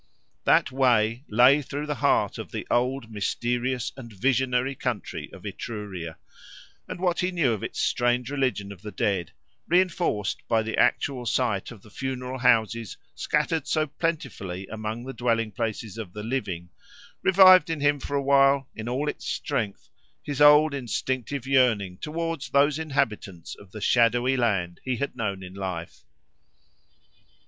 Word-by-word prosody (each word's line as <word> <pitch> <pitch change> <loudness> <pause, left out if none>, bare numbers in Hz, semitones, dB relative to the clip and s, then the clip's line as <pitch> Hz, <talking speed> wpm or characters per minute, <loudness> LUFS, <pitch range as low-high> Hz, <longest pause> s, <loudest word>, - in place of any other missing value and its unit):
That - - +4
Way 120 -1 +2
lay 125 +6 +6
through 145 +2 -5
the 150 - -2
heart - - +2
of - - -7
the - - -5
old, 125 -1 0
mysterious 120 +4 -1
and 125 -3 -10
visionary 125 +4 +1
country 125 -4 -4
of - - -13
Etruria; 95 -7 -6 0.7
and - - -6
what 180 -1 0
he 180 - +1
knew 165 -10 +1
of 105 - -4
its - - -5
strange 120 +1 +1
religion 130 -8 -1
of 95 -3 -11
the 105 - -7
dead, 95 -3 -1 0.4
reinforced 170 - +1
by 115 -1 +2
the 110 - -3
actual 125 -4 +1
sight 115 -7 0
of 110 -5 -12
the 110 - -16
funeral 130 0 -4
houses 115 -3 +2 0.2
scattered 150 0 -1
so 155 -1 +1
plentifully 135 - -3
among 110 +2 -5
the 135 - -6
dwelling 115 -3 0
places 110 +1 -4
of 95 -6 -7
the 105 - -6
living, 100 -8 -3 0.5
revived 185 -3 +7
in 160 -2 -2
him 145 0 +2
for 140 - -4
a 140 - -1
while, 135 0 +4
in 110 +1 -5
all 135 +5 -1
its - - -4
strength, 115 -9 -3 0.3
his 145 -1 -4
old 150 +1 +7
instinctive 130 +1 -3
yearning 115 -9 +2
towards 165 -2 -3
those 145 +2 +3
inhabitants 110 - -2
of 100 - -14
the 110 - -8
shadowy 120 +3 +3
land 100 -8 0
he 130 -1 -1
had 140 +4 -3
known 100 -6 -3
in 90 0 -9
life. 95 -4 -6
125 Hz, 155 wpm, -26 LUFS, 110-140 Hz, 0.7 s, revived